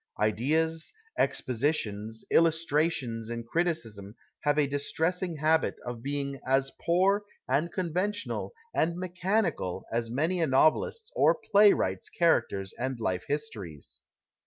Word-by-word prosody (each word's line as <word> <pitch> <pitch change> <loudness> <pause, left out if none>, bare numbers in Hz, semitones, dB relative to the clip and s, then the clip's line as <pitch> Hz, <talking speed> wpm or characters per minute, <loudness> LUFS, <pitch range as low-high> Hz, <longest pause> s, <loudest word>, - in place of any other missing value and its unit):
Ideas, 155 +10 +1 0.3
expo 130 - 0
sitions, 110 -5 -1
illustrations 155 -8 +1
in 115 0 -4
criticism 115 - -2 0.2
have 145 -1 +1
a 150 - +4
distressing 160 +5 -1
habit 155 +2 +2
of 120 -1 -5
being 140 0 -3
as 135 +1 +1
poor 190 +4 +3 0.2
and 145 +6 +1
conventional 185 +4 -2 0.2
and 170 +1 +1
nicciiani 185 +1 0
eal 90 -1 -4
as 115 0 -1
many 160 +9 0
a 165 - +2
novelists 155 - +2
or - - +5
playwrights 200 - +3
characters 100 - +1
and 130 0 -2
life 90 -5 -1
histories. 95 - -5
145 Hz, 120 wpm, -29 LUFS, 115-170 Hz, 0.3 s, or